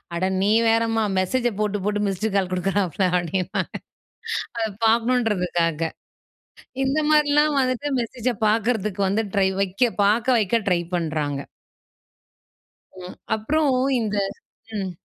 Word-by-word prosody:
"அட 175 Hz, +2 st, 0 dB, 0.2 s
நீ 205 Hz, -, +2 dB, 0.2 s
வேறம்மா, 225 Hz, 0 st, +2 dB, 0.2 s
மெசேஜ 240 Hz, +7 st, 0 dB
போட்டு, 210 Hz, -1 st, 0 dB
போட்டு 210 Hz, 0 st, 0 dB
மிஸ்ட் 195 Hz, +2 st, -1 dB
கால் 190 Hz, -2 st, +1 dB
குடுக்குறாப்பள" 190 Hz, 0 st, 0 dB
அப்படின்பாங்க. 175 Hz, +1 st, -2 dB, 0.9 s
அத 225 Hz, -1 st, 0 dB, 0.2 s
பாக்கணும்ன்றதுக்காக. 190 Hz, -9 st, +1 dB, 0.9 s
இந்த 275 Hz, +3 st, 0 dB
மாரில்லாம் 295 Hz, 0 st, +3 dB
வந்துட்டு 255 Hz, +3 st, -1 dB
மெசேஜ 240 Hz, +1 st, -3 dB, 0.2 s
பாக்கறதுக்கு 215 Hz, -2 st, 0 dB
வந்து 220 Hz, +3 st, +1 dB
ட்ரை 190 Hz, -1 st, +3 dB
வைக்க 200 Hz, +5 st, +1 dB
பாக்க 215 Hz, +4 st, +2 dB
வைக்க 220 Hz, +2 st, +1 dB
ட்ரை 175 Hz, -1 st, +2 dB
பண்றாங்க. 155 Hz, -4 st, -2 dB, 1.7 s
ம். 180 Hz, -, -9 dB, 0.2 s
அப்புறம் 295 Hz, +7 st, +1 dB, 0.3 s
இந்த 210 Hz, -2 st, -2 dB, 0.6 s
ம், 190 Hz, -2 st, -3 dB
210 Hz, 110 wpm, -23 LUFS, 185-235 Hz, 1.7 s, மாரில்லாம்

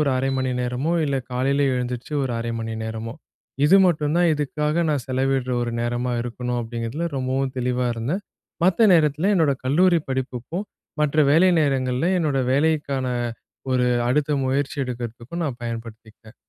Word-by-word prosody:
ஒரு 145 Hz, -2 st, +2 dB
1/2 135 Hz, +1 st, 0 dB
மணி 130 Hz, 0 st, 0 dB
நேரமோ, 125 Hz, +7 st, -1 dB
இல்ல 140 Hz, -2 st, 0 dB, 0.2 s
காலையில் 135 Hz, +3 st, +1 dB
எழுந்திரிச்சு 125 Hz, +3 st, -3 dB
ஒரு 130 Hz, -, -2 dB
1/2 115 Hz, 0 st, -3 dB
மணி 115 Hz, 0 st, -4 dB
நேரமோ, 110 Hz, +1 st, -5 dB, 0.5 s
இது 180 Hz, +6 st, +7 dB
மட்டும் 150 Hz, -2 st, +1 dB
தான் 175 Hz, -1 st, +4 dB
இதுக்காக 150 Hz, +3 st, -1 dB
நான் 140 Hz, -5 st, -1 dB
செலவிடுற 130 Hz, -1 st, 0 dB
ஒரு 120 Hz, -, -2 dB
நேரமா 120 Hz, +1 st, -1 dB
இருக்கணும், 125 Hz, 0 st, -3 dB
அப்படிங்கிறதுல 115 Hz, +8 st, -3 dB
ரொம்பவும் 130 Hz, +1 st, -1 dB
தெளிவா 125 Hz, 0 st, 0 dB
இருந்தேன். 140 Hz, -, -2 dB, 0.4 s
மத்த 200 Hz, +5 st, +4 dB
நேரத்தில 155 Hz, +3 st, +3 dB
என்னோட 160 Hz, -6 st, +3 dB
கல்லூரி 170 Hz, +6 st, +4 dB
படிப்புக்கும் 130 Hz, -, -3 dB, 0.3 s
மற்ற 150 Hz, 0 st, +1 dB
வேலை 170 Hz, +5 st, +5 dB
நேரங்கள்ல 130 Hz, 0 st, +1 dB
என்னோட 150 Hz, -5 st, 0 dB
வேலைக்கான 140 Hz, -3 st, +1 dB, 0.7 s
ஒரு 125 Hz, -1 st, +2 dB, 0.2 s
அடுத்த 150 Hz, +3 st, +1 dB
முயற்சி 135 Hz, +2 st, -1 dB
எடுக்கிறதுக்கும் 120 Hz, +6 st, -5 dB
நான் 135 Hz, -5 st, -3 dB
பயன்படுத்திக்கிட்டேன். 115 Hz, -1 st, -8 dB
130 Hz, 145 wpm, -23 LUFS, 125-150 Hz, 0.7 s, இது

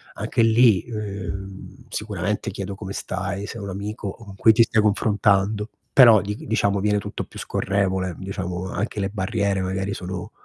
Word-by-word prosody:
anche -, -, 0 dB
lì, 115 Hz, -3 st, +5 dB
ehm, 95 Hz, -1 st, -6 dB
sicuramente 105 Hz, -1 st, -2 dB
chiedo 100 Hz, 0 st, -5 dB
come 95 Hz, -1 st, -7 dB
stai, 95 Hz, +2 st, -3 dB
sei 115 Hz, -, -7 dB
un 100 Hz, -, -5 dB
amico 100 Hz, +1 st, -4 dB
con 105 Hz, -4 st, -12 dB
cui 110 Hz, -, +6 dB
ti 115 Hz, -, +6 dB
stai 110 Hz, -1 st, +2 dB
confrontando, 105 Hz, 0 st, +2 dB, 0.2 s
però 120 Hz, -5 st, +8 dB
dighi 105 Hz, +2 st, -6 dB
diciamo 100 Hz, -3 st, +1 dB
viene 105 Hz, +1 st, +2 dB
tutto 105 Hz, 0 st, -5 dB
più -, -, -14 dB
scorrevole, 95 Hz, -3 st, -1 dB
diciamo, 95 Hz, -1 st, -4 dB
anche 105 Hz, +3 st, -3 dB
le 95 Hz, -, -1 dB
barriere 100 Hz, -1 st, -1 dB
magari 95 Hz, +1 st, -2 dB
sono 90 Hz, -1 st, -6 dB
100 Hz, 160 wpm, -23 LUFS, 95-105 Hz, 0.2 s, però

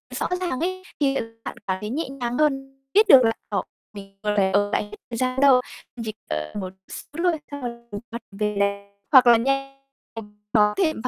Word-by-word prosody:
rõ -, -, -1 dB
ràng 345 Hz, -8 st, -2 dB
ấy 370 Hz, +2 st, -2 dB, 0.2 s
thì, 275 Hz, -1 st, +2 dB
ờ, -, -, +1 dB, 0.2 s
bạn -, -, -5 dB
cảm 190 Hz, 0 st, 0 dB
thấy 210 Hz, -, -4 dB
nhẹ 300 Hz, 0 st, -2 dB
nhàng 245 Hz, -3 st, -3 dB
hơn, 270 Hz, -3 st, 0 dB
biết 425 Hz, +1 st, +5 dB
được 260 Hz, -5 st, +9 dB
là, 225 Hz, -, +4 dB, 0.2 s
ờ, 200 Hz, -3 st, 0 dB, 0.3 s
mình 195 Hz, -1 st, -11 dB
còn 210 Hz, 0 st, +1 dB
lại, 190 Hz, -2 st, +3 dB
ờ, 205 Hz, 0 st, +2 dB
hết 210 Hz, -, 0 dB, 0.2 s
thời 230 Hz, -, -3 dB
gian 255 Hz, +1 st, 0 dB
đâu, 265 Hz, -3 st, +6 dB, 0.4 s
chỉ 215 Hz, -, -3 dB, 0.2 s
cần 75 Hz, 0 st, -3 dB
một 185 Hz, -1 st, -6 dB, 0.2 s
xíu 330 Hz, +4 st, -7 dB
thôi, 340 Hz, -4 st, +2 dB
xong 285 Hz, -1 st, -6 dB
là 235 Hz, -1 st, -4 dB, 0.3 s
hoặc 235 Hz, -, -5 dB
về 210 Hz, +1 st, -2 dB
là 200 Hz, 0 st, 0 dB, 0.3 s
hoặc 255 Hz, -3 st, +8 dB
là 235 Hz, -1 st, +8 dB
nhanh 275 Hz, +2 st, -1 dB, 0.4 s
thì 225 Hz, -, -4 dB, 0.3 s
có 210 Hz, -1 st, +4 dB
thể 320 Hz, -4 st, +2 dB
245 Hz, 210 wpm, -24 LUFS, 205-275 Hz, 0.4 s, được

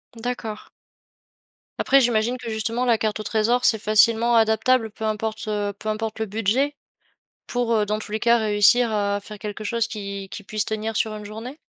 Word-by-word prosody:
D'accord. 225 Hz, -2 st, -5 dB, 1.1 s
Après 275 Hz, 0 st, +5 dB
j'imagine 235 Hz, 0 st, +1 dB
que, 240 Hz, -2 st, -7 dB
justement, 225 Hz, +2 st, -1 dB
la 240 Hz, -3 st, +3 dB
carte 215 Hz, 0 st, -2 dB
au -, -, -6 dB
trésor, 225 Hz, +4 st, +1 dB
c'est 220 Hz, -, +4 dB
facilement 225 Hz, +2 st, +4 dB
adaptable 225 Hz, +1 st, +3 dB
peu 220 Hz, -, -6 dB
importe, 215 Hz, 0 st, -3 dB
heu, 205 Hz, -1 st, -1 dB
peu -, -, -8 dB
importe 215 Hz, 0 st, -3 dB
le 220 Hz, -, 0 dB
budget? 225 Hz, +8 st, 0 dB, 0.7 s
Pour, 245 Hz, -1 st, -1 dB
heu, 215 Hz, -2 st, +2 dB
dans 210 Hz, +1 st, -1 dB
tous 210 Hz, -, -9 dB
les 215 Hz, -, -1 dB
cas, 235 Hz, +2 st, +4 dB
réussir 220 Hz, +3 st, +4 dB
à 205 Hz, -1 st, 0 dB
faire 210 Hz, +1 st, -10 dB
quelque 210 Hz, +1 st, -6 dB
chose 230 Hz, +2 st, 0 dB
qui 200 Hz, -3 st, -6 dB
qui 205 Hz, -, -8 dB
puisse 210 Hz, +1 st, -2 dB
tenir 220 Hz, 0 st, -3 dB
sur 220 Hz, 0 st, 0 dB
une 210 Hz, 0 st, -8 dB
journée? 225 Hz, +7 st, -8 dB
220 Hz, 190 wpm, -23 LUFS, 210-235 Hz, 1.1 s, Après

